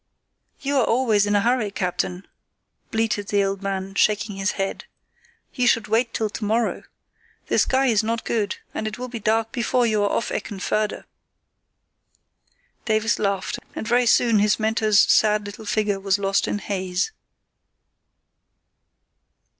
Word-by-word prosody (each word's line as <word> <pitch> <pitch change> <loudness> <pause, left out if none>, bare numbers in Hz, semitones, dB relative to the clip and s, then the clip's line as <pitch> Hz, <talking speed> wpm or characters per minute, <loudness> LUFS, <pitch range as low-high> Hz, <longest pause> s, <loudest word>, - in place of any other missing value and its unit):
"You 280 0 0
are 260 - +4
always 225 -4 +2
in 205 - +1
a 205 - +4
hurry, 240 -1 +1
captain," 180 -1 -3 0.6
bleated 220 -2 -1
the 205 -1 +2
old 195 0 -2
man, 195 -1 -3
shaking 210 0 +1
his 195 -1 0
head. 195 0 -3 0.7
"You 250 -1 +1
should 230 -2 +2
wait 225 +2 +1
till 220 - -1
to 215 - -6
morrow. 225 +3 0 0.6
The - - +2
sky 265 +1 +2
is 225 -5 +3
not 225 +1 -2
good, 210 -4 -1 0.2
and 220 - -3
it 215 - -5
will 250 0 -6
be 235 -1 -6
dark 225 +1 0
before 245 0 +1
you 215 -2 +1
are 205 - +2
off 230 - -1
Eckenförde." 210 +1 -2 1.8
Davies 220 0 +1
laughed, 200 -2 -1 0.2
and 220 - -5
very 245 +1 +3
soon 230 -1 +4
his 210 +1 +3
mentor's 215 -1 +2
sad 210 -1 +3
little 205 +2 -9
figure 205 -2 0
was 195 0 +1
lost 195 0 0
in - - -1
haze. 190 - -2
215 Hz, 150 wpm, -23 LUFS, 200-230 Hz, 1.8 s, are